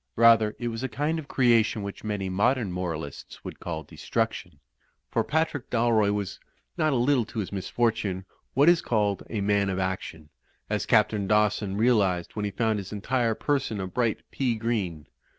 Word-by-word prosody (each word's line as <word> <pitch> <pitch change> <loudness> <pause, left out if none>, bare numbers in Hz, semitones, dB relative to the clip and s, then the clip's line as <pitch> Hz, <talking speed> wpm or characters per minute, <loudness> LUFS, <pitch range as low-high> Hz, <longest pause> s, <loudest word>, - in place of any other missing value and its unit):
Rather 115 -2 +5
it 120 - -2
was 115 0 -5
a 130 - -2
kind 150 +6 -1
of 150 - -8
creation 115 -5 +3
which 100 0 -7
many 105 -3 -2
modem 105 +3 +1
moralists 80 -5 -5
would - - -7
call 80 -2 -4
destruction. - - -3 0.5
For - - +1
Patrftk 160 -3 -1
Dalroy 115 -3 +3
was, 100 -2 -3 0.4
not 155 - +2
a - - +1
little 125 +1 +3
to 115 - -11
his 105 -4 -2
misfortune, 100 -1 -1 0.3
what 140 +3 +5
is 175 -1 +6
called 105 -4 0
a 105 - -2
man 100 0 +2
of 95 - -2
action; 95 -5 -4 0.4
as - - -1
Captain 105 -3 +3
Dawson 105 -1 +2
realised 100 -7 +2
when 105 -1 -2
he - - -1
found 110 0 0
his 95 -1 -8
entire 115 +2 0
person 135 -7 -1
a 95 - -2
bright 115 +4 -1
pea 125 -4 0
green. 105 -9 -2
105 Hz, 175 wpm, -27 LUFS, 95-120 Hz, 0.5 s, is